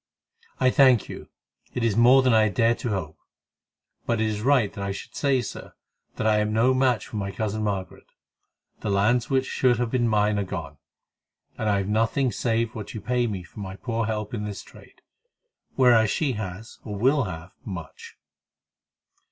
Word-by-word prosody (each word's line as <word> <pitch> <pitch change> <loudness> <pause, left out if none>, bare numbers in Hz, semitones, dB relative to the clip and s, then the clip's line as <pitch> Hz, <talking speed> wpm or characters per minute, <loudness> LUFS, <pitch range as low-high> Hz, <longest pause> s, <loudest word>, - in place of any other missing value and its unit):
"I 130 - +4
thank 130 -5 +4
you; - - -9 0.5
it 125 - -1
is 115 -3 +1
more 125 +3 +6
than 130 -2 +3
I 110 -1 +4
dared 115 +4 +1
to 120 - -3
hope. 85 -6 -4 0.9
But 115 -1 +1
it 110 - +1
is 105 -1 -2
right 125 -4 +2
that 100 - -6
I 100 - -2
should 95 - -8
say, 135 -3 +1
Sir, - - -8 0.4
that 110 - -3
I 110 -1 +3
am 105 0 0
no 115 +4 +3
match 130 -5 +1
for 110 - -7
my 100 -1 -2
cousin 110 +1 -3
Margaret. 100 -3 -4 0.7
The - - -4
lands 110 +5 +2
which 135 -1 +1
should 125 -2 +2
have 120 -1 -1
been 120 -2 +1
mine 105 -1 +2
are - - 0
gone, 95 - -6 0.8
and 110 - -2
I 100 - +2
have 100 -1 -2
nothing 115 +5 +1
save 115 -1 -1
what 110 -1 -7
you - - -4
pay 125 +1 0
me 100 -5 -4
for 85 - -14
my 95 -1 -6
poor 115 +1 -2
help 105 -1 -3
in 105 -3 -3
this 105 -2 -6
trade; - - -18 0.7
whereas 120 -4 +5
she 145 +2 0
has, 105 -1 -7
or 105 - -6
will 135 +4 +2
have, 90 -1 -7
much." 85 -6 -9
110 Hz, 190 wpm, -25 LUFS, 105-125 Hz, 0.9 s, more